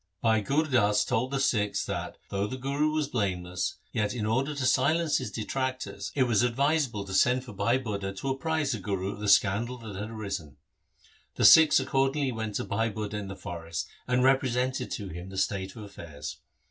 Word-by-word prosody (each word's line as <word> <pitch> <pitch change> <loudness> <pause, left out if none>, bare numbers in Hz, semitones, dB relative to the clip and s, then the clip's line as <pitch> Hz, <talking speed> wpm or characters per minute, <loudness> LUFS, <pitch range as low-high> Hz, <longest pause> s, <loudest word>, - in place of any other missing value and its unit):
1 115 - +3
Bhai 110 -1 +3
Gur 140 +9 +1
Das 105 -8 +2
told 125 +3 0
the 140 0 -1
Sikhs 105 -6 +1
that, - - -4
though 100 +1 -1
the 130 - -5
Guru 140 +4 0
was 155 -2 0
blameless, 90 -8 -2 0.2
yet 105 0 -1
in 110 -3 -2
order 135 +7 0
to 135 -2 -2
silence 155 +5 +3
his - - -4
detractors 110 -3 -3
it 135 - +4
was 120 -4 +2
advisable 125 -3 +1
to 95 - -7
send 125 +6 +3
for 120 - -9
Bhai 105 +5 +2
Budha 100 -6 -3
to 135 - -3
apprise 155 +1 0
the 115 - -2
Guru 95 0 -2
of 100 - -9
the 105 - -3
scandal 105 +5 +3
that 110 -4 -8
had 105 +3 -5
arisen. 100 - -5 0.8
The - - +2
Sikhs 160 -2 +8
accordingly 135 +1 +1
went 110 -3 -4
to - - -1
Bhai 110 +3 0
Budha 105 -1 -5
in 105 -1 -4
the 95 - -6
forest 85 -2 -5 0.2
and 125 0 +2
represented 130 -1 +1
to 100 -3 -5
him 90 +2 -7
the 95 - -8
state 95 0 -1
of 110 - -8
affairs. 85 -7 -8
110 Hz, 200 wpm, -28 LUFS, 100-130 Hz, 0.8 s, Sikhs